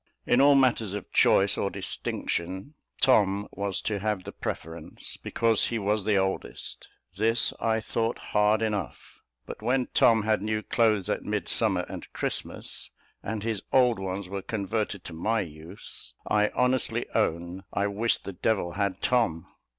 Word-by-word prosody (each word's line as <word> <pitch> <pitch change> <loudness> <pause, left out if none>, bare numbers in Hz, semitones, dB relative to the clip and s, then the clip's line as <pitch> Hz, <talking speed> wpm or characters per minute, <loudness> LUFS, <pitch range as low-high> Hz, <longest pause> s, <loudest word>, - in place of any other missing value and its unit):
In 125 - +4
all 140 0 +7
matters 115 -7 +3
of 105 - -7
choice 100 +1 +4
or 100 - +1
distinction, 95 - -3 0.3
Tom 100 -6 +4
was 100 -1 -2
to 105 -2 -1
have 105 -2 -1
the - - -7
preference, 80 +1 -6
because 115 -2 +1
he 115 - -1
was 105 -1 0
the 105 -2 +3
oldest: 95 -10 -3 0.3
this 115 +3 +2
I 110 -1 +1
thought 115 +1 -1 0.2
hard 105 +1 +4
enough; 105 -5 -4 0.2
but - - -8
when 125 +3 +1
Tom 115 -2 +5
had 110 -1 +1
new 110 +1 -1
clothes 110 -5 +2
at - - -1
Midsummer - - +1
and - - -8
Christmas, - - -3 0.3
and 110 -2 -4
his 110 -3 -2
old 125 -5 +4
ones 95 0 -4
were 100 +1 -4
converted 100 -1 -2
to 85 - -7
my 110 +7 0
use, 80 -2 -8
I 105 0 +3
honestly 125 0 +1
own 85 +3 -1
I 100 - 0
wished 105 +3 0
the 100 - -5
devil 90 -1 0
had 100 0 -2
Tom. 110 -11 +2
105 Hz, 155 wpm, -27 LUFS, 95-115 Hz, 0.3 s, all